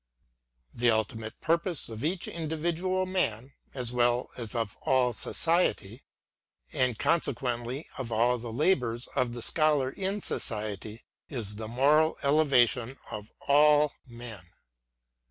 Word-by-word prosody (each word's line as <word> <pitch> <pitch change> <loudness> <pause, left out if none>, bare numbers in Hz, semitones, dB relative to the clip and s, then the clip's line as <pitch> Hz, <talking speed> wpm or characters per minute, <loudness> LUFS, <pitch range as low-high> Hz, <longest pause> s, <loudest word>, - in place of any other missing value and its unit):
The 120 +1 +2
ultimate 110 0 -2
purpose 170 -1 0
of 110 +1 -7
each 170 +3 -1
individual 170 +3 -1
man, 135 - -1 0.2
as 125 -2 -3
well 120 0 +1
as 115 -3 -5
of 115 -3 -2
all 125 -2 +2
society, 140 - 0 0.7
and 125 -3 +1
consequently 125 -2 -1
of 120 -3 -4
all 120 +2 +2
the 115 0 -6
labours 125 -4 +1
of 120 -2 0
the 120 -1 -4
Scholar 150 -4 +2
in 195 +4 -2
society, 110 - -3 0.3
is 110 -7 -5
the 110 0 -5
moral 145 +7 +3
elevation 135 -4 +3
of 105 -1 -7
all 150 +1 +5
men. 120 -5 -9
125 Hz, 120 wpm, -29 LUFS, 115-155 Hz, 0.7 s, all